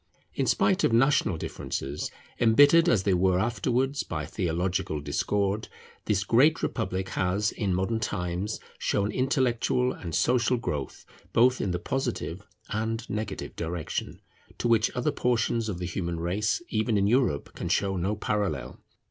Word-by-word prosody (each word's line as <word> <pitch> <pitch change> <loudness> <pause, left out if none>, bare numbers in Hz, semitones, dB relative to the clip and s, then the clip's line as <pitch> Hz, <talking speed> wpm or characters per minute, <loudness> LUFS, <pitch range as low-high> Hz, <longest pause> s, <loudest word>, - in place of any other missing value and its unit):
In - - -1
spite 195 +1 +2
of - - +3
national 120 - +3
differences, 70 -1 -4 0.3
embittered 145 +9 +6
as 100 - +3
they 100 - +2
were 90 0 +3
afterwards 125 +6 0
by 80 -3 -4
theological 85 -2 -1
discord, 100 +8 -1 0.4
this 100 -2 +1
great 140 +10 +4
Republic 95 -5 -2
has 95 +4 0
in 95 -4 -1
modern 95 +5 0
times 95 -1 -2 0.2
shown 100 +1 0
intellectual 130 -1 +1
and 85 -3 -6
social 125 0 +2
growth 75 - -4 0.3
both 125 +2 +4
in 100 - -1
the 90 - 0
positive 120 -5 -3 0.3
and 110 +2 -2
negative 110 +1 -4
direction, 85 -1 -4 0.4
to - - -1
which 115 -1 +3
other 125 - +1
portions 115 -2 0
of 95 - -3
the 90 - -4
human 85 -1 -3
race, 100 - 0
even 110 0 +1
in 100 - +2
Europe, 115 - +1
can - - -5
show 100 -1 +1
no 95 +4 -1
parallel. 100 - -2
105 Hz, 150 wpm, -27 LUFS, 90-120 Hz, 0.4 s, embittered